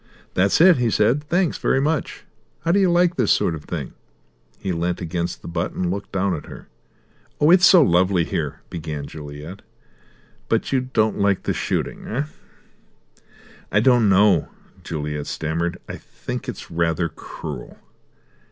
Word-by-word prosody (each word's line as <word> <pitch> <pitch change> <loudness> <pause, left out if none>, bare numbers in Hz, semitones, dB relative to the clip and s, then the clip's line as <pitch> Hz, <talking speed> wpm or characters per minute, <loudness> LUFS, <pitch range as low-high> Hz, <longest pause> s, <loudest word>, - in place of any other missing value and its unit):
"That's 95 +2 +2
it," 175 0 +7
he 120 -2 +1
said. 115 +8 +2
"Thanks 175 +1 0
very - - +2
much. 150 +2 -1 0.4
How 165 +2 +1
do 200 - +4
you 190 -2 +4
like 175 0 +3
this 120 -5 +2
sort 85 - +2
of 75 -2 -8
thing?" - - -5 0.6
He 95 - -3
leant 85 +1 -1
against 85 0 -3
the - - -8
butt 85 +1 -2
and 90 -1 -1
looked 100 +1 -5
down 95 0 0
at 80 - -6
her. - - -11 0.7
"Oh, 150 +3 +5
it's 180 0 +7
so 180 -5 +7
lovely 90 -2 +3
here," 75 - -3
began 75 -3 -5
Juliet. 75 +5 -9 0.9
"But - - 0
you 135 -2 +2
don't 110 -2 +1
like 100 -1 +2
the - - 0
shooting, - - -3
eh?" 130 +6 -1 1.5
"I 105 - +4
don't 120 -2 +4
know," 95 -3 +4 0.3
Juliet 75 -2 -4
stammered. 85 +2 -2
"I - - -6
think - - -7
it's - - -8
rather 85 0 0
cruel." - - -8
95 Hz, 160 wpm, -22 LUFS, 85-135 Hz, 1.5 s, it